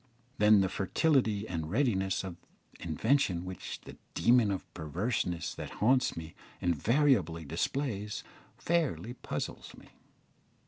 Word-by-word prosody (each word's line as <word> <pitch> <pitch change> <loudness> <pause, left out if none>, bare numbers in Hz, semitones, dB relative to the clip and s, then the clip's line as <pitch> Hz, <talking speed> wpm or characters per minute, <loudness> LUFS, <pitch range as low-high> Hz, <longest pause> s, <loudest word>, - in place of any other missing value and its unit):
Then 105 -1 +7
the 95 - +2
fertility 110 - +1
and 80 -3 -3
readiness 95 - +1
of 90 -3 -6 0.4
invention 90 - +1
which 90 -1 -6
the - - -11 0.2
demon 120 -3 +4
of 95 -2 -2
perverseness 90 - -2
that - - -7
haunts 125 0 +3
me 80 0 -7 0.3
invariably 90 - +2
displays, 105 - -2 0.3
fairly 155 -8 0
puzzles - - -5
me. - - -15
100 Hz, 110 wpm, -31 LUFS, 90-125 Hz, 0.4 s, Then